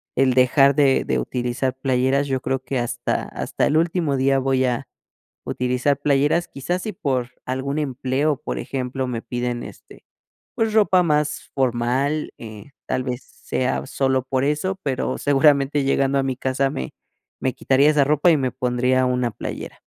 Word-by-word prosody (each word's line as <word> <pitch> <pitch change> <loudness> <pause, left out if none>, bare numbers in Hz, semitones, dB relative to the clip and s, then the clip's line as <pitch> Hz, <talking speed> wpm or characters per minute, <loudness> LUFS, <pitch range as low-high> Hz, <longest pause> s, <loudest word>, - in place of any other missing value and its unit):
el 130 -1 +3
dejar 135 +2 +5
de 140 -3 +3
de - - 0
utilizar 125 +1 -2
playeras, 130 +1 +1
yo 130 -2 -1
creo 135 0 -1
que 130 0 -2
hasta 120 -1 -2
hasta - - -2
el 155 - +2
último 165 -3 +1
día 135 +1 +2
voy 130 0 +1
a 125 +1 -2 0.6
utilizar 125 +3 0
playeras. 145 +4 +2
Quizás 175 +7 -3
si 215 - -4
por 130 - -2
algún 130 +3 -2
empleo, 140 +1 0
por 60 -1 -3
ejemplo, 130 - -3
me 115 -2 -3
piden, 120 -1 -3
este, - - -13 0.5
pues 225 -1 0
ropa 195 -4 +4
más 150 -3 0
formal, 130 +4 0
eh, 110 +4 -10
tal 130 - -1
vez 125 0 -4
sea 130 0 -3
sólo 130 -1 0
por 130 0 0
eso, 150 +7 0
pero 135 -2 -1
seguramente, 145 0 +3
llegando 135 0 +2
a 135 - +2
mi 130 -2 -2
casa, 135 +1 0
me 65 0 -5 0.5
me 130 - -1
quitaría 140 +3 +3
esa 150 -2 +3
ropa 150 +4 +3
y 160 - +5
me 130 -2 -1
pondría 125 0 +1
una 125 -1 0
playera. - - -7
135 Hz, 165 wpm, -22 LUFS, 125-145 Hz, 0.6 s, dejar